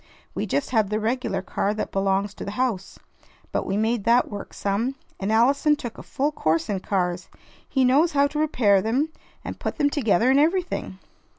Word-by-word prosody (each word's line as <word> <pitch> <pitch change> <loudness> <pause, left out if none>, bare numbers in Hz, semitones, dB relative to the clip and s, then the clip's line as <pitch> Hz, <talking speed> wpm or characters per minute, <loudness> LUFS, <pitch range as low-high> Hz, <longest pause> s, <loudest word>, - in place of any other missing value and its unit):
We - - -3
just 285 - -1
had 220 -5 +2
the 215 +1 0
regular 220 -4 -1
car 200 +2 -1
that 215 - -4
belongs 195 +1 0
to - - -8
the - - -5
house. 235 -7 -2 0.5
But - - -2
we 195 - -1
made 220 0 0
that 235 +1 +3
work 205 -1 -7
some. 220 +7 -1 0.2
And 195 +2 -1
Allison 275 +7 +4
took 240 -5 -7
a - - -7
full 285 +3 -1
course 160 - 0
in 200 -2 -1
cars. 180 -2 -2 0.4
He 265 -2 +2
knows 295 +7 +3
how 280 0 +4
to 300 +1 -2
repair 225 -10 +3
them, 255 +9 0 0.4
and - - -6
put - - -3
them 290 -2 +2
together, 245 - +2
and 270 - +4
everything." 335 - 0
230 Hz, 195 wpm, -24 LUFS, 200-280 Hz, 0.5 s, Allison